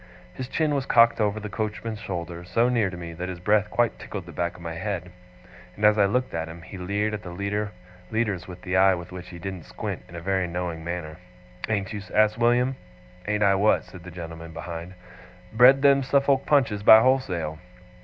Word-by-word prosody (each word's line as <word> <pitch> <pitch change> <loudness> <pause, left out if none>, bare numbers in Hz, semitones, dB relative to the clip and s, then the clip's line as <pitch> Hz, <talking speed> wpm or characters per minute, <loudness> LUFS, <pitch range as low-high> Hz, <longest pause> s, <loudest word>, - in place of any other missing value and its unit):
His 130 - -6
chin 155 +2 0
was 140 -1 -1
cocked 115 -1 +5
over 105 0 +1
the 105 - -6
coachman's 110 +1 -4
shoulder, 85 -3 -5
so 115 +7 +1
near 115 -6 +2
to 90 - -8
me, 85 -1 -7
that 90 +3 -5
his 90 -2 -6
breath 105 +2 +2
quite 120 -1 0
tickled 95 -4 -7
the 85 - -10
back 85 0 -2
of - - -13
my 85 -1 -4
head; 90 0 -4 0.6
and 105 - 0
as 105 0 +6
I 100 - +6
looked 125 +6 0
at 80 0 -2
him, 85 +1 -10
he 90 +1 -9
leered 100 +4 -1
at 105 - -4
the 100 +3 -3 0.4
leaders 105 -6 -1
with 90 -1 -10
the 90 - -2
eye 95 0 +5
with 85 0 -9
which 90 -1 -8
he 85 - -9
didn't 90 -1 -6
squint, - - -5
in 85 - -11
a - - -5
very 95 +1 0
knowing 85 -2 -4
manner. 85 -2 -5 0.5
'Ain't 100 -2 -1
you?' 105 - -4
asked 110 +1 +3
William. 125 +2 +2 0.5
'Ain't 105 0 +1
I 100 -1 +5
what?' 100 +3 +3
said 90 -2 -13
the 90 - -9
gentleman 80 -1 -8
behind. 85 +1 -7 0.6
'Bred 130 +4 +6
them 140 -1 +6
Suffolk 140 0 +2
Punches 130 -9 +2
by 110 +1 +9
wholesale? 90 -12 0
100 Hz, 210 wpm, -25 LUFS, 85-110 Hz, 0.6 s, by